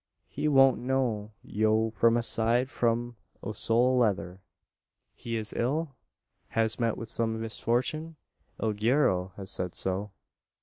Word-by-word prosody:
He - - -3
won't 135 -2 +5
know 120 -5 -1
yo 110 +1 +1
from 115 +1 +3
a 120 - 0
side 120 +3 +2
o' 115 -5 -2
sole 120 +4 +2
leather." 95 -5 0 0.7
"He 115 -1 -5
is 110 -2 -2
ill? 140 +4 -1 0.6
Has 110 +1 +1
met 115 -2 0
with 115 - -6
some 110 0 0
misfortune? 125 +8 -2 0.4
El 110 -1 0
guero 105 -5 +1
has 95 -2 -4
said 90 -1 -2
so." 95 +2 -2
115 Hz, 130 wpm, -28 LUFS, 105-125 Hz, 0.7 s, won't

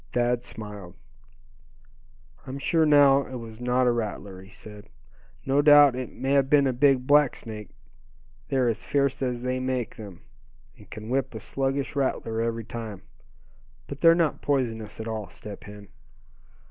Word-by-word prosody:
Thad 120 0 +1
smiled. 105 -6 -9 1.5
"I'm 130 +1 -5
sure 160 +3 +2
now 140 -2 +6
it 130 - -8
was 115 -1 -9
not 125 +1 +1
a 125 - +4
rattler," 100 -4 -4
he 95 - -15
said. 105 0 -13 0.6
"No 135 +2 +3
doubt 145 -3 +7
it 130 -1 -5
may 135 +1 -3
have 140 -1 +3
been 145 -1 +5
a 130 - +1
big 130 0 +3
black 145 -1 +4
snake. 105 -2 -9 0.8
They're 130 -2 +1
as 115 -1 -1
fierce 140 -2 0
as 125 -2 -2
they 125 0 -1
make 130 -3 -3
them, 100 -5 -11 0.5
and - - -18
can 110 +1 -9
whip 130 -1 -1
a - - -5
sluggish 135 +5 -3
rattler 115 -5 -1
every 115 -1 -2
time, 110 -4 -7 0.8
but 140 0 -9
they're 165 0 +7
not 165 -3 0
poisonous 115 -7 -2
at 110 - -5
all, 110 -3 -5
Step 105 -2 -10
Hen." 105 -1 -12
125 Hz, 160 wpm, -26 LUFS, 110-135 Hz, 1.5 s, doubt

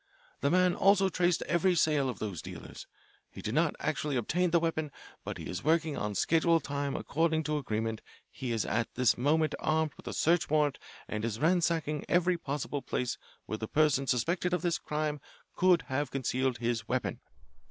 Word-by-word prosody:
The 140 - +1
man 180 +1 +4
also 195 +1 +4
traced 175 -1 +1
every 180 +1 +2
sale 150 -5 +2
of 125 - -4
those 100 -6 -4
dealers. - - -9 0.4
He - - -12
did - - -2
not - - +2
actually 150 -2 -1
obtain 175 +9 +1
the 170 +1 +4
weapon, 160 -2 -1 0.3
but - - -5
if - - -7
he - - -5
is 90 - -5
working 160 0 +2
on 105 -1 -3
schedule 165 +5 +3
time 140 -2 -3
according 160 +1 0
to 150 0 -1
agreement 110 -3 -2 0.3
he 130 -2 -5
is 115 -2 0
at 115 +1 -1
this 125 -1 +3
moment 155 +5 +2
armed 155 -1 +1
with - - -14
a - - -3
search 170 +1 +2
warrant 150 -2 +2 0.3
and 105 0 -3
is 115 -1 -2
ransacking 165 -2 +1
every 175 0 +2
possible 145 -1 -3
place 125 -2 -2 0.3
where 110 - -4
the 110 - -4
person 145 -2 +2
suspected 170 +9 +1
of 180 - -4
this 170 -2 +1
crime 150 -1 -2 0.3
could 180 -2 +4
have 135 +1 -2
concealed 130 -1 -1
his 120 -1 -2
weapon. - - -1
150 Hz, 185 wpm, -30 LUFS, 130-170 Hz, 0.4 s, man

